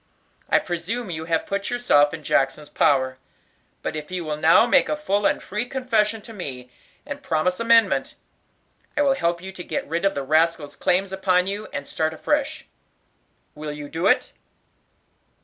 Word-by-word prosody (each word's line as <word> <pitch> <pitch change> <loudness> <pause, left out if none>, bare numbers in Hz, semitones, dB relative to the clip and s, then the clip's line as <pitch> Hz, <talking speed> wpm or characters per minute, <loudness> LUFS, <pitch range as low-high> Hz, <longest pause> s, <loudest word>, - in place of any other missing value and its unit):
I - - +5
presume 185 +5 -3
you 160 -1 -4
have 165 -1 0
put 200 0 -2
yourself 150 -13 +3
in 160 -2 -7
Jackson's 145 +2 0
power; 130 -3 +2 0.6
but - - -3
if 150 -1 -6
you 180 -2 -4
will 155 -1 -2
now 160 +8 +5
make 240 - +3
a 305 - 0
full 205 -9 +1
and - - 0
free 210 +5 -3
confession 225 -5 0
to 225 - -10
me, 130 - -7 0.3
and 290 0 -6
promise 180 - 0
amendment, 230 0 +3 0.8
I 295 - +4
will 275 -1 +4
help 170 -6 -1
you 190 - -6
to 185 -2 -8
get - - -3
rid 165 +4 -2
of 195 - +2
the 140 - -2
rascal's 155 +1 +1
claims 185 +1 +1
upon 185 -1 +2
you, 200 +2 -4
and 140 - -5
start 160 0 -1
afresh. 295 - -1 0.9
Will 150 0 -6
you 150 0 -7
do 165 +2 -1
it?" - - +2
180 Hz, 175 wpm, -23 LUFS, 155-215 Hz, 0.9 s, I